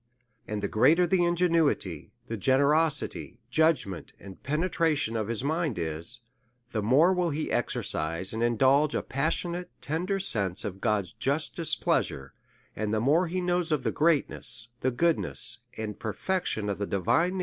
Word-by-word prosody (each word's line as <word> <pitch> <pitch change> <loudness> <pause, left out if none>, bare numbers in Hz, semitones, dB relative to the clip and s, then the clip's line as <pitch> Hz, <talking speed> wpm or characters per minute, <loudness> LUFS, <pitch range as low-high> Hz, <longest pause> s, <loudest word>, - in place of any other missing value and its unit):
And 105 -1 -4
the - - +1
greater 160 - +4
the 175 +1 +2
ingenuity, 165 - +1
the 115 - -5
generosity, 145 - +1
judg 160 +1 +3
ment, 95 -4 -8
and 95 -2 -12
penetration 155 -5 0
of 110 -2 -2
his 115 +1 -1
mind 155 - -1
is, 85 +8 -3 0.5
the 110 - -1
more 140 - +4
will 180 -2 0
he 155 +1 -3
exercise 85 +5 0
and 110 - -3
indulge 135 +6 +3
a - - -1
passionate, 170 +5 -2
tender 180 +6 -2
sense 100 - +1
of 95 -2 -6
God's 100 -4 0
just 140 +7 -1
displeasure; 145 - -1 0.4
and 105 0 -2
the 110 - +1
more 155 +10 +2
he 180 +2 -2
knows 175 -1 0
of 150 -4 0
the - - 0
greatness, 140 -7 +1
the 130 - +1
goodness, 120 - 0 0.2
and 110 -1 -5
perfection 110 - -2
of 100 -1 -3
the 100 - -2
divine 100 - -1
DEVOUT 90 - 0
AND 175 +2 +3
HOLY 190 - -5
LIFE. - - -2
140 Hz, 170 wpm, -27 LUFS, 105-165 Hz, 0.5 s, greater